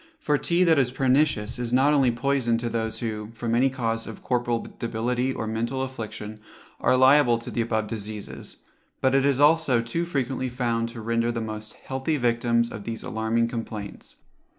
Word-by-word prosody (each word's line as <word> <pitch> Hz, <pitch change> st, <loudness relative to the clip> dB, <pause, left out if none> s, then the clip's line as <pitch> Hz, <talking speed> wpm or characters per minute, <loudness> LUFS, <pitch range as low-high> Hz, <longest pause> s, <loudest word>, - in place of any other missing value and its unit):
For 150 Hz, -, +1 dB
tea 175 Hz, +1 st, +2 dB
that 165 Hz, -4 st, +4 dB
is 130 Hz, -2 st, +2 dB
pernicious 130 Hz, -3 st, +1 dB
is 120 Hz, -1 st, -3 dB
not 135 Hz, +4 st, +4 dB
only 135 Hz, -4 st, +4 dB
poison 120 Hz, -1 st, +1 dB
to 120 Hz, 0 st, -3 dB
those 110 Hz, -1 st, -2 dB
who, 110 Hz, -2 st, -4 dB
from 115 Hz, 0 st, -2 dB
any 130 Hz, +3 st, +4 dB
cause 115 Hz, -3 st, -2 dB
of 110 Hz, -, -9 dB
corporal 120 Hz, -2 st, 0 dB
debility 120 Hz, +3 st, -1 dB
or 115 Hz, -, -4 dB
mental 115 Hz, +4 st, -2 dB
affliction, 110 Hz, -4 st, -6 dB, 0.4 s
are 130 Hz, -, +3 dB
liable 130 Hz, -2 st, +6 dB
to 115 Hz, -, -8 dB
the 120 Hz, -, 0 dB
above 110 Hz, -1 st, 0 dB
diseases; 105 Hz, -1 st, -7 dB, 0.4 s
but 130 Hz, 0 st, +2 dB
it 135 Hz, 0 st, +3 dB
is 140 Hz, -2 st, +2 dB
also 145 Hz, -4 st, +4 dB
too 115 Hz, +9 st, -2 dB
frequently 135 Hz, -5 st, -2 dB
found 115 Hz, -2 st, -1 dB
to 115 Hz, -1 st, -8 dB
render 115 Hz, +1 st, 0 dB
the 115 Hz, -, -3 dB
most 110 Hz, -1 st, -5 dB
healthy 135 Hz, +4 st, -3 dB
victims 115 Hz, -1 st, +1 dB
of 105 Hz, -, -7 dB
these 115 Hz, +1 st, -5 dB
alarming 110 Hz, +1 st, 0 dB
complaints. 110 Hz, -3 st, -6 dB
120 Hz, 180 wpm, -25 LUFS, 115-130 Hz, 0.4 s, liable